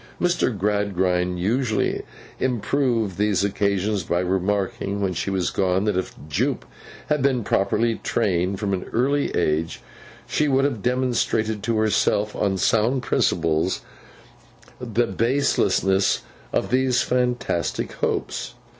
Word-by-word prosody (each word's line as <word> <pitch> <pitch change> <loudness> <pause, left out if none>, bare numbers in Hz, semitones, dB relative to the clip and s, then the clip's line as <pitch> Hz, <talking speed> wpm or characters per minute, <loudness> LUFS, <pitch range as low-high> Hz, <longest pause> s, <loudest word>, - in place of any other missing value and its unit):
Mr. 175 -6 +2
Gradgrind 95 -3 0
usually 110 +3 0 0.4
improved 120 -4 0
these 105 -3 +2
occasions 100 0 0
by 85 +1 -1
remarking, 95 +2 -1
when 95 -2 0
she 90 - -2
was 90 -7 0
gone, 95 +2 +1
that 105 -2 0
if 95 - -3
Jupe 75 - -1 0.4
had 150 -2 0
been 130 -3 +2
properly 110 +4 +1
trained 95 -3 0
from 100 -2 -1
an 90 - -2
early 140 +4 +1
age 80 0 0 0.5
she 150 - 0
would 135 0 +3
have 120 -8 -2
remonstrated 120 -4 0
to 115 0 0
herself 105 0 +1
on 95 -2 0
sound 115 +6 +2
principles 85 +1 +1 1.0
the 120 -1 0
baselessness 115 -6 +2 0.3
of - - -1
these 130 -1 +2
fantastic 125 -9 -1
hopes. - - -3
105 Hz, 120 wpm, -23 LUFS, 95-120 Hz, 1.0 s, would